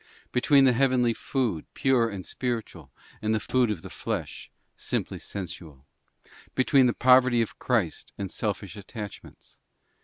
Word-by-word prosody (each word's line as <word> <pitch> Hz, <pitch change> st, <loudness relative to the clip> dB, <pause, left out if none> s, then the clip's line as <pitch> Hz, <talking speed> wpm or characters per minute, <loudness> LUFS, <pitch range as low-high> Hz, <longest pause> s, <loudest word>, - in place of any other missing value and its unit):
BOOK -, -, -39 dB
Between 135 Hz, +2 st, +4 dB
the 130 Hz, -2 st, +5 dB
heavenly 125 Hz, -2 st, +3 dB
food, 115 Hz, -, -2 dB
pure 125 Hz, -4 st, +3 dB
and 95 Hz, -4 st, -6 dB
spiritual, 110 Hz, -, -4 dB, 0.3 s
and 110 Hz, 0 st, +1 dB
the -, -, +1 dB
food 125 Hz, +2 st, +1 dB
of 100 Hz, -7 st, -3 dB
the -, -, -8 dB
flesh, -, -, -5 dB, 0.3 s
simply -, -, -3 dB
sensual? 85 Hz, -7 st, -8 dB, 0.7 s
Between 130 Hz, 0 st, +4 dB
the 120 Hz, -, +1 dB
poverty 125 Hz, -2 st, +5 dB
of 110 Hz, -, -9 dB
Christ 110 Hz, -10 st, -1 dB
and 100 Hz, -2 st, -4 dB
selfish 100 Hz, -2 st, -3 dB
attachments? 105 Hz, +1 st, -10 dB
115 Hz, 145 wpm, -27 LUFS, 100-130 Hz, 0.7 s, the